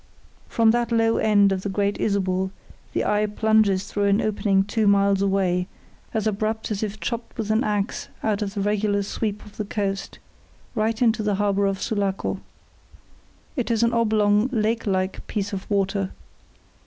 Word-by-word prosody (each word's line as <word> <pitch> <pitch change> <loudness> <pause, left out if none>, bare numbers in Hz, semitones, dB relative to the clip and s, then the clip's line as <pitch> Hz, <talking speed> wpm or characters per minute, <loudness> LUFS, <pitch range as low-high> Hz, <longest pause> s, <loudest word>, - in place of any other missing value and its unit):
From 225 -1 +3
that 240 0 0
low 225 0 +3
end 205 -2 +4
of 190 -1 -1
the 200 - -3
Great 200 +1 0
Isabel 190 -2 0 0.4
the - - -1
eye 210 0 +2
plunges 210 -2 +2
through 205 -1 -1
an 200 +1 +3
opening 200 -2 +2
two 215 +1 0
miles 200 -1 +4
away, 190 -2 +1 0.4
as 220 -2 -1
abrupt 215 +1 -1
as 200 - -2
if 215 -1 -3
chopped 235 0 -4
with 220 -2 -2
an 220 +3 +2
axe 205 0 -2
out 215 -1 0
of 200 0 -3
the 200 - -1
regular 205 0 +1
sweep 210 +1 -3
of 210 - -15
the 215 - -1
coast, 195 -1 -3 0.6
right 220 +1 0
into 225 -2 +3
the 210 -1 0
harbour 200 0 +1
of 195 -1 -1
Sulaco. 200 -4 -1 1.2
It 250 -5 -2
is 230 -1 +2
an 235 0 +2
oblong, 215 -1 +3
lake 225 -1 0
like 190 -1 -1
piece 205 -1 -3
of 195 -1 -5
water. 195 -1 0
205 Hz, 170 wpm, -24 LUFS, 195-220 Hz, 1.2 s, end